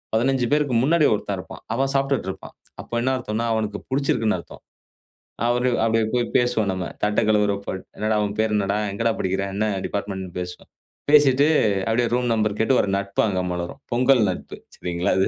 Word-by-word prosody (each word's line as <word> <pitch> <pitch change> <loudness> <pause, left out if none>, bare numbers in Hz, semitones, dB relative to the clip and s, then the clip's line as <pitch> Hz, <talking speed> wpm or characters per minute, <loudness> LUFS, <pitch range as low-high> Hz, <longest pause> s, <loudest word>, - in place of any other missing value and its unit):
15 125 +2 +2
பேருக்கு 145 -4 +1
முன்னாடி 155 +2 +4
ஒருத்தன் 100 -2 -2
இருப்பான். 90 - -10
அவன் 135 +2 0
சாப்ட்டுட்டு 135 -6 0
இருப்பான். - - -12 0.3
அப்ப - - -17
என்ன 130 +2 +1
அர்த்தம்னா, 115 -2 -3
அவனுக்கு 105 -2 -1
பிடிச்சிருக்குன்னு 125 -7 +1
அர்த்தம். - - -13 0.8
அவரு 125 +1 +2
அப்டியே 115 -1 +2
போய் 120 -1 +2
பேசுவோம் 120 -4 +2
நம்ம. 95 -2 -3 0.2
தட்ட 105 0 +2
கழுவுறப்ப, 105 -2 +1 0.3
"என்னடா? 110 0 0
உன் 100 0 -4
பேர் 110 -1 +1
என்னடா? 100 0 0
எங்கடா 115 +3 0
படிக்கிற? 95 +1 -1
என்ன 105 +2 0 0.2
டிபார்ட்மென்ட்னு" 95 -2 -4
பேசுவோம். 90 0 -7 0.4
பேசிட்டு 145 -1 +6 0.4
அப்டியே 120 +1 +2
ரூம் 125 0 +1
நம்பர் 110 -2 0
கேட்டு, 120 +4 +3
ஒரு - - -2
நட்பு 100 0 -1
அங்க 95 -3 0
மலரும். 85 -1 -5
பொங்கல் 125 +1 +4
நட்பு. 90 - -6 0.2
சரிங்களா 90 0 -2
அது? 95 - +3
110 Hz, 170 wpm, -23 LUFS, 100-125 Hz, 0.8 s, பேசிட்டு